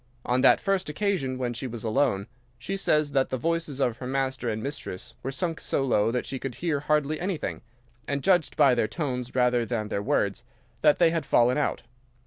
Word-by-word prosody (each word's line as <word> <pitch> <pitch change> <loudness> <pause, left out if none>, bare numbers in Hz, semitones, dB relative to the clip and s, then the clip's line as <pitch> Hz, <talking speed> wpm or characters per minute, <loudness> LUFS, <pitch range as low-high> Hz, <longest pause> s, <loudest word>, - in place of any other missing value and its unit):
On 125 +1 +1
that - - +6
first 195 -3 0
occasion, 150 -6 -1
when 125 -2 -2
she 130 +3 -4
was 120 -3 -7
alone, 110 -3 +1 0.3
she 130 +11 -4
says 150 -6 +1
that 135 -1 +1
the 130 - -1
voices 165 0 -2
of 120 -4 +1
her 125 - -6
master 130 -2 -1
and 110 0 -3
mistress 140 -9 -6
were 135 - -3
sunk 165 +4 -2
so 135 - -1
low 110 -5 +2
that 125 +1 -1
she 135 - -4
could 135 -2 -5
hear 165 -4 -1
hardly 150 +1 0
anything, 180 -2 -3 0.5
and 140 -1 -2
judged 180 -5 +2
by 135 - +6
their 120 -3 +1
tones 125 -6 -4
rather 125 -1 +3
than 115 -3 -3
their 100 - -1
words 100 +1 0 0.4
that 150 -1 +5
they 170 -2 +4
had 165 -2 -1
fallen 125 0 +3
out. 150 - -1
135 Hz, 205 wpm, -27 LUFS, 120-155 Hz, 0.5 s, that